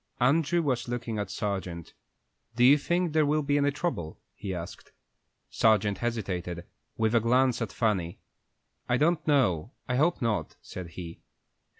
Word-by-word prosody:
Andrew 155 +6 +3
was 130 -4 -1
looking 120 -2 -3
at 100 -2 -3
Sargent. 95 -5 -4 0.6
"Do 120 - +2
you 140 +4 +7
think 175 +2 0
there 155 -1 +4
will 150 +1 +1
be 145 0 +2
any 145 0 +3
trouble?" 140 - -3
he 100 - -6
asked. 90 0 -7 0.6
Sargent 105 -2 +3
hesitated, 90 -7 -3 0.3
with 110 0 +1
a 120 - +5
glance 125 +2 +2
at 110 -5 -2
Fanny. 95 -7 -1 0.7
"I 120 - +3
don't 160 +3 +2
know; 125 - +2
I 125 -1 0
hope 160 +5 +2
not," 115 -5 -1
said 90 -2 -8
he. 85 -2 -8
120 Hz, 155 wpm, -28 LUFS, 95-145 Hz, 0.7 s, you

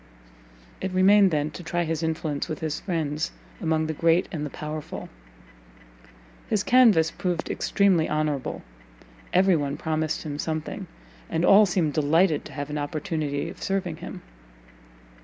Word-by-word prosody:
It 190 - -2
remained 195 +2 +6
then 150 -2 -1
to - - -8
try 175 +1 -1
his 165 -1 -2
influence 160 -3 -2
with 155 - -3
his 155 -1 -3
friends 155 -4 -2 0.3
among 160 -1 +1
the 160 - -2
great 165 +3 +2
and 155 -6 -3
the 150 - -3
powerful. 150 +1 -6 1.4
His 210 -2 +1
canvas 215 -11 +5
proved 175 -3 -2
extremely 190 -6 +2
honourable; 150 -3 -2 0.7
every 185 0 +4
one 145 -2 -2
promised 155 0 -2 0.2
something, 155 -1 -4 0.4
and 165 +2 0
all 205 +1 +7
seemed 175 -5 0
delighted 155 +2 +2
to - - -10
have 145 0 -5
an 150 - -2
opportunity 150 -1 -2
of 170 - -9
serving 185 -4 -2
him. - - -8
160 Hz, 140 wpm, -25 LUFS, 150-180 Hz, 1.4 s, all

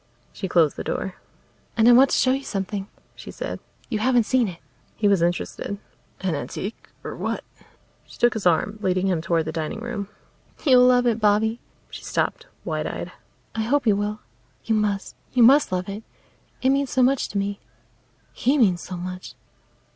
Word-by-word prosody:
She 190 - -4
closed 165 -4 +3
the - - -4
door. 190 -1 -3 0.6
"And 225 0 +5
I - - +9
want 255 +3 +7
to - - +1
show 255 - +3
you 270 +1 -1
something," 195 -2 -3 0.3
she - - -11
said. - - -5 0.3
"You 220 -4 -2
haven't 245 +1 +3
seen 250 -1 +2
it." 175 -3 -7 0.4
He 210 - +1
was 200 -4 +3
interested. 175 +3 -2 0.4
"An 185 -3 0
antique? 195 +8 -5
Or - - -6
what?" - - -3 0.6
She - - -14
took 240 - +3
his 215 -5 0
arm, 205 +5 +1
leading 185 -1 +1
him 180 -4 +1
toward 165 -1 0
the 160 - -3
dining 160 +7 -4
room. 230 -4 -4 0.6
"You'll 250 -3 +7
love 250 0 +4
it, 230 -2 +2
Bobby." 220 +2 +2 0.3
She - - -9
stopped, - - -2 0.2
wide - - -2
eyed. - - -5 0.4
"I 225 - -2
hope 265 +5 +1
you 215 -3 +4
will. 210 +1 -2 0.4
You 225 - +1
must; 210 -2 -1 0.2
you 250 -2 +5
must 275 +2 +6
love 185 +1 -1
it. 200 +2 -5 0.6
It 260 - +4
means 275 -1 +1
so 255 - +2
much 265 +1 +2
to 200 - -4
me 200 0 -2 0.7
he 270 +5 +1
means 190 -9 +3
so 180 - -6
much." 180 +1 -7
210 Hz, 185 wpm, -24 LUFS, 185-245 Hz, 0.7 s, I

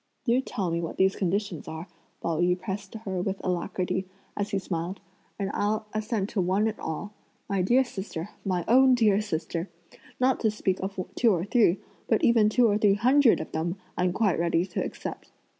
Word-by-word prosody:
"Do 245 +1 +3
tell 195 -9 -3
me 170 0 0
what 165 - -5
these 190 +1 +3
conditions 195 -2 -2
are," 160 +3 -6 0.4
Pao 165 -2 0
yü 180 +1 +2
pressed 195 +1 -5
her 195 -5 -3
with 195 +1 -2
alacrity, 185 +1 -1 0.3
as 205 0 -2
he 200 - 0
smiled, 180 0 -3 0.4
"and 200 -1 -2
I'll 215 +1 0
assent 215 -1 -1
to 210 - 0
one 190 +4 +2
and 220 - -3
all. 180 +6 -5 0.3
My 195 -2 0
dear 240 +8 +4
sister, 190 -6 -6
my 180 -4 -1
own 260 +2 +6
dear 215 -4 +3
sister, 170 -2 -3 0.5
not 255 0 +3
to 220 - +2
speak 195 -3 -1
of 195 0 -4
two 235 -2 +3
or 175 -2 0
three, 205 -5 +3 0.3
but 220 - +2
even 225 -3 +5
two 240 +2 +4
or 210 -1 +2
three 205 -2 +4
hundred 255 +3 +5
of 160 - -6
them 170 +4 -2 0.2
I'm 180 0 +1
quite 195 -2 +1
ready 170 0 +2
to - - -3
accept. - - -6
195 Hz, 190 wpm, -27 LUFS, 180-215 Hz, 0.5 s, own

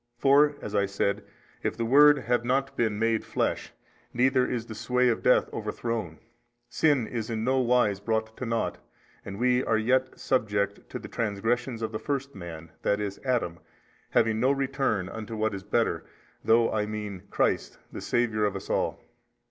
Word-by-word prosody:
For 145 +3 +5
(as 105 - -5
I 100 -1 +2
said) 100 0 -1 0.4
if - - -2
the 115 - -1
Word 145 +4 +7
have 120 -2 0
not 135 +3 0
been 110 -3 0
MADE 115 0 +1
flesh, - - -2 0.4
neither 130 +1 +3
is 115 -2 -3
the 115 - -8
sway 125 +3 +1
of 115 - 0
death - - +4
overthrown, 110 -9 -3 0.5
sin 145 -3 +2
is 115 0 -4
in 110 -1 -2
no 130 +2 +2
wise 120 -5 +2
brought 110 +1 -2
to 130 - -4
nought, 115 0 -1 0.4
and 100 - -7
we 125 +2 +2
are 110 - +2
yet 130 +4 +1
subject 100 -5 -1
to - - -5
the - - -9
transgressions 115 +2 -1
of 110 - -2
the 110 - -4
first 140 -1 -3
man, 85 -4 -9
i. 100 - +3
e. 105 0 -2
Adam, 120 -10 -1 0.5
having 110 -1 +2
no 130 +3 +3
return 135 -8 0
unto 110 +2 -6
what 110 0 0
is 100 - -5
better, 110 +4 0 0.4
through 115 +1 +4
(I 105 -1 0
mean) 105 -3 -5
Christ - - 0
the - - -7
Saviour 110 -3 +1
of 100 - -1
us - - -5
all. - - -1
115 Hz, 180 wpm, -27 LUFS, 105-125 Hz, 0.5 s, Word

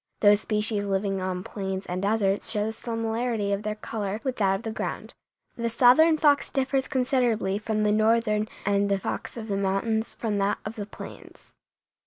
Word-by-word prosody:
Those 205 0 +6
species 210 -1 0
living 195 -1 -1
on 185 -1 -3
plains 190 -1 -4
and 180 +1 -3
deserts 200 0 +1
show 210 -2 0
the 220 - -3
similarity 225 -2 -2
of 200 - -1
their 215 0 -3
color 210 -1 -4
with 260 -2 -2
that 195 -2 +2
of 195 - -6
the 225 - -3
ground; - - -4 0.4
the 235 -1 -1
southern 260 +8 +5
fox 290 -2 +3
differs 270 0 0
considerably 245 -7 +1
from 215 0 -1
the 210 - +3
northern 215 0 +2 0.2
and 200 0 +2
the 200 - +2
fox 195 - -5
of 220 -1 -6
the 200 -2 -1
mountains 200 +3 -1
from 210 -3 -2
that 200 +1 +1
of 215 +2 -5
the 205 -2 -5
plains. - - -12
215 Hz, 185 wpm, -26 LUFS, 200-230 Hz, 0.4 s, Those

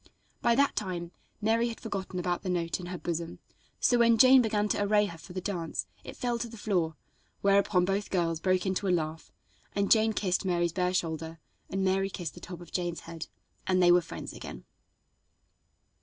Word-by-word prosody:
By 235 0 +3
that 280 +2 +3
time 180 -4 -3 0.3
Mary 225 +2 +2
had 230 - -6
forgotten 195 -4 -4
about 180 0 -1
the 190 - -4
note 170 -1 -1
in 175 - -7
her 180 0 -4
bosom; 170 -1 -4 0.4
so 245 - +3
when 230 -1 +5
Jane 260 +2 +8
began 210 -2 +1
to - - +1
array 210 +1 +3
her 170 -5 -7
for 180 - -11
the 185 - -3
dance, 170 - -2 0.2
it - - -9
fell 240 -1 -1
to 235 - -3
the 230 0 -11
floor, 180 -7 0 0.5
whereupon 195 -2 +3
both 195 +2 -1
girls 165 -3 0
broke 185 +1 +1
into 190 +1 -1
a - - +2
laugh, 160 -2 -1 0.4
and 200 0 0
Jane 220 0 +5
kissed 185 -3 0
Mary's 175 -3 +1
bare 180 0 0
shoulder, 160 -1 -2 0.3
and 195 0 -1
Mary 195 +1 +2
kissed 175 -4 -5
the - - -11
top 175 -1 -9
of 175 - -12
Jane's 175 -2 -2
head, 165 -1 -7 0.4
and 185 -1 +3
they 175 -1 +6
were 175 0 +6
friends - - -7
again. - - -9
185 Hz, 200 wpm, -29 LUFS, 175-210 Hz, 0.5 s, Jane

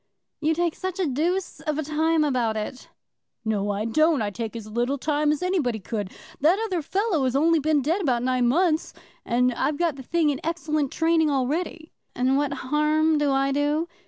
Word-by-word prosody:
"You 315 +1 +1
take 345 -1 0
such 375 -1 -5
a 370 - +2
deuce 335 +7 -1
of 305 -2 -3
a 315 - -1
time 315 +2 +1
about 245 -6 0
it." 215 +4 -6 0.6
"No, 205 -2 0
I 205 +1 -1
don't. 310 +6 +3
I 205 -1 -1
take 225 +2 -5
as 225 -2 -6
little 240 +6 -1
time 295 +1 +1
as 300 +3 -2
anybody 325 -11 0
could. 205 -1 -4 0.3
That 320 +7 +4
other 370 -6 -1
fellow 380 -1 0
has 255 0 0
only 325 +3 +4
been 300 -1 +1
dead 335 +8 0
about 250 -8 +1
nine 255 -1 +1
months, 320 +4 +1 0.3
and 250 +1 +2
I've 285 +5 -1
got 330 -4 0
the - - -7
thing 315 +3 +1
in 275 - -4
excellent 310 -4 -1
training 325 -1 +2
already." 315 +4 -2 0.2
"And 255 +2 +2
what 285 0 +1
harm 300 +3 +1
do 290 -1 +2
I 275 0 +1
do?" 295 +4 0
295 Hz, 195 wpm, -25 LUFS, 255-325 Hz, 0.6 s, That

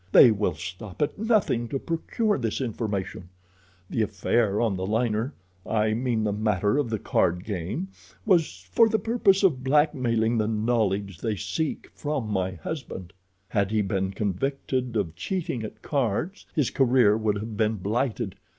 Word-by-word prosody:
They 120 - +9
will 100 -6 0
stop 90 +5 -8
at 150 +6 -3
nothing 210 - +2
to 135 - -2
procure 175 - -1
this 115 -3 -1
information. 105 -7 -3 0.6
The 115 - -1
affair 105 0 +1
on 115 -4 +1
the 95 0 -3
liner—I 110 -2 -1
mean 115 -1 0
the 105 -1 0
matter 105 +3 +1
of 140 -5 0
the 110 - 0
card 90 -2 +1
game—was 155 - -2
for 230 -1 +5
the 220 - +2
purpose 205 -2 +2
of 140 -10 +3
blackmailing 125 -5 +2
the 105 - +1
knowledge 105 -4 0
they 110 -3 -1
seek 155 - -3
from 145 -6 -3
my 95 -2 0
husband. 95 - -6 0.4
"Had 100 -2 +1
he 110 -1 +1
been 95 -1 -1
convicted 125 +5 -2
of 90 -7 -1
cheating 160 - -3
at 110 0 -8
cards, 140 - -1
his 150 -6 +1
career 125 -5 +4
would 110 -1 0
have 110 +1 -5
been 110 +1 +1
blighted. 110 +1 -1
110 Hz, 150 wpm, -26 LUFS, 100-135 Hz, 0.6 s, They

